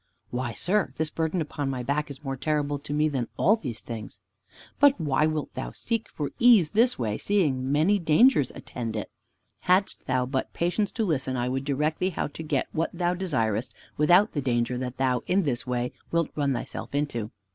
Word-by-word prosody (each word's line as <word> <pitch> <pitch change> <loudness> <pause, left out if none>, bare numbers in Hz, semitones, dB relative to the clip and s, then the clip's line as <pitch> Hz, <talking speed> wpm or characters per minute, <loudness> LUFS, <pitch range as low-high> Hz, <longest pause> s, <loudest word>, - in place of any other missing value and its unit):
"Why, 120 -1 -2
sir, 195 - 0
this 160 -1 -1
burden 165 +2 -1
upon 145 -2 -3
my 130 -2 -3
back 145 +4 -1
is 140 +1 -9
more 135 -1 -3
terrible 145 +1 -1
to 145 - -9
me 150 +1 +2
than 130 -6 -2
all 210 +5 +5
these 130 - -6
things." 110 -3 -7 0.6
"But 285 -4 +5
why 150 -1 +2
wilt 155 -2 -3
thou - - -5
seek 230 -1 -3
for 145 -2 -4
ease 230 -10 +6
this 235 +4 +3
way, 110 -3 -2
seeing 185 -10 +2
so - - -4
many 155 +10 +2
dangers 160 - +4
attend 115 -2 -5
it? 105 - -4 0.5
Hadst 185 +2 +1
thou 125 -1 +1
but 130 +1 -3
patience 180 +5 0
to 225 - 0
listen, 135 -7 0
I 120 0 0
could 135 +1 -2
direct 150 +2 0
thee 185 - +1
how 185 - -2
to 155 - -8
get 150 -4 -1
what 165 - 0
thou 175 0 0
desirest, 125 - -1 0.2
without 175 +8 +5
the 145 - -2
danger 120 -1 0
that 125 -1 -4
thou 130 -2 +1
in 190 +2 +3
this 130 -3 -2
way 125 0 -1 0.2
wilt 170 -1 +1
run 145 -2 +1
thyself 130 - -5
into." 120 -7 -1
145 Hz, 200 wpm, -26 LUFS, 130-175 Hz, 0.6 s, ease